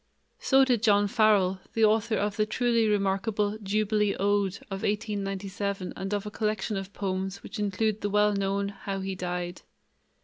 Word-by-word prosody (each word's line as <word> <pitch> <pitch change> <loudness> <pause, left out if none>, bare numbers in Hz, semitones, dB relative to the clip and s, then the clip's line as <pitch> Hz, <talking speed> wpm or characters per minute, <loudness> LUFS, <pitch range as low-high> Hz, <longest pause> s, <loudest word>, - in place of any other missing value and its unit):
So 270 0 +4
did 245 -5 +2
John 205 -2 +4
Farrell, 200 -4 +3
the 225 -1 +4
author 220 +1 +2
of 205 -1 -1
the 215 -1 +1
truly 235 -1 +2
remarkable 205 +1 0
"Jubilee 210 0 +1
Ode" 200 -1 +1 0.2
of 195 0 -4
1897 200 -2 -2
and 195 +1 -5
of 205 0 -1
a 210 - -5
collection 210 0 -1
of 195 0 -5
poems 190 -1 -3
which - - -7
include 210 +1 0
the 205 - -1
well 210 +1 +3
known 200 0 0
"How 195 -1 -5
He 190 0 -3
Died." 180 -1 -4
205 Hz, 165 wpm, -28 LUFS, 195-215 Hz, 0.2 s, So